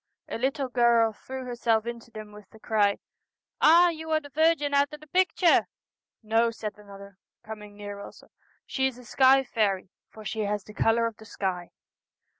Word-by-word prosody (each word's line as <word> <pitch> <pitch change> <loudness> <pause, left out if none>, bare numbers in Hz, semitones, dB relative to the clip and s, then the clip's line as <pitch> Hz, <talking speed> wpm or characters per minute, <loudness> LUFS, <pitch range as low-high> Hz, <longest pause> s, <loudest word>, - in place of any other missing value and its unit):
A - - -5
little 270 +2 -1
girl 235 -2 +3
threw 260 +4 -8
herself 235 -2 0
into 235 0 -7
them 215 -2 -10
with 210 -1 -14
the 220 - -17
cry, 205 -2 +1 0.3
' - - -65 0.2
Ah, 345 +3 +7
you 320 -1 -6
are 315 0 +2
the 285 -2 -14
Virgin 310 -1 +2
out 280 0 +3
o' 300 - -8
the 305 - -16
picture! 360 +1 +3 0.2
' - - -67
' - - -62
No,' 230 +1 +4
said 215 -2 -6
another, 200 -1 -13 0.2
coming 210 -2 -10
near 205 -1 -7
also, 200 - -12 0.2
' - - -38
she 265 -1 0
is 260 -2 -6
a 250 - -14
sky 265 +3 +4
faery, 200 -6 -1 0.2
for 215 -1 -13
she 220 - -4
has 205 -1 -1
the 210 - -13
colour 225 +2 +2
of 230 -2 -4
the 220 - -14
sky.' 185 -4 -4
230 Hz, 205 wpm, -27 LUFS, 210-270 Hz, 0.3 s, Ah